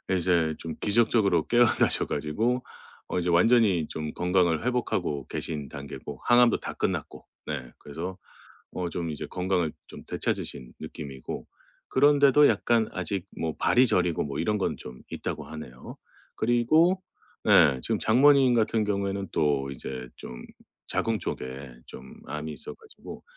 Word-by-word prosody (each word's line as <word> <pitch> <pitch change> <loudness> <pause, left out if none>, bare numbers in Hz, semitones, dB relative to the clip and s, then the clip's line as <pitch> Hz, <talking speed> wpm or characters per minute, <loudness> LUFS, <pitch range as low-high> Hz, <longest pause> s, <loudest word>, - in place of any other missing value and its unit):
이제 85 -3 +1
좀 80 -2 -6
기적적으로 105 -5 +2
깨어나셔 120 -1 +3
가지고 110 - -1 0.4
어 - - -3
이제 90 0 -1
완전히 95 -2 +4
좀 75 -1 -5
건강을 90 -2 +1
회복하고 120 - -1
계신 75 -4 -4
단계고 70 -1 -8
항암도 120 -1 +5
다 - - -6
끝났고. - - -3 0.2
네 65 -5 -5
그래서 85 +6 -6 0.6
어 90 -1 -3
좀 85 -1 -3
이제 75 - -5
건강을 90 -3 -1 0.2
좀 - - -11
되찾으신 60 -1 -3
느낌이고. 70 -3 -7 0.4
그런데도 145 +1 +5
약간 115 +1 +2
아직 95 0 -2
뭐 80 -1 -2
발이 125 +2 +4
저리고 90 -5 +1
뭐 70 0 -4
이런 105 +6 +1
건 100 - -1
좀 65 0 -10
있다고 - - -4
하네요. 65 -6 -10 0.4
그리고 155 +11 +3 0.4
네 65 -3 +6
지금 - - -1
장모님 135 +2 +5
같은 110 -1 +2
경우에는 100 -1 -2
또 70 -3 +1
이제 65 -2 -6
좀 - - -9 0.4
자궁 115 -1 0
쪽에 65 -4 -6
좀 65 0 -11
암이 75 +1 -5
있어 - - -8
가지고 445 -2 -12
90 Hz, 300 characters per minute, -27 LUFS, 75-115 Hz, 0.6 s, 네